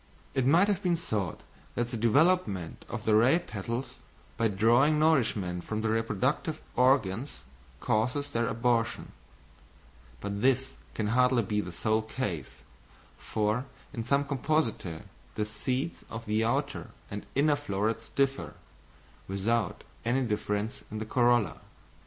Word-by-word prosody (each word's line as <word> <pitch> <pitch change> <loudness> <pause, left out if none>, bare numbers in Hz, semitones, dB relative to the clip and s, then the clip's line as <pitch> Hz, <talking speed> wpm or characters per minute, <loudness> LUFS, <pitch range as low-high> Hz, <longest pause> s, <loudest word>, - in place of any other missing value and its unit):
It 130 -2 +1
might 170 +8 +6
have 200 -2 +1
been 180 -3 +2
thought 110 - -2 0.3
that 120 0 0
the 120 - -4
development 115 - +2
of - - -5
the 110 - +3
ray 120 +9 +6
petals, 120 - -5 0.4
by 115 - +2
drawing 120 +9 +4
nourishment 110 - +2
from 110 0 -3
the 110 - 0
reproductive 115 +8 0 0.2
organs 125 -1 +2 0.4
causes 125 +7 0
their 115 -4 0
abortion; 115 -1 0 1.1
but 100 0 -4
this 130 +1 +2 0.2
can 105 -2 -1
hardly 125 0 +4
be 105 +1 0
the 90 - -7
sole 110 +5 +1
case, 105 - -5 0.5
for 110 +4 -1 0.3
in 115 - -3
some 140 +4 +2
Compositæ 135 - -1 0.3
the 105 0 0
seeds 130 +8 -2
of 115 0 -6
the 110 +1 +1
outer 140 +5 -1 0.2
and 105 0 -4
inner 145 +2 +4
florets 115 -3 -2
differ, 135 -1 0 0.7
without 100 +2 0 0.2
any 125 +3 +1
difference 105 0 -2
in 110 - -5
the 110 - -3
corolla. 120 -2 +2
115 Hz, 135 wpm, -29 LUFS, 105-135 Hz, 1.1 s, might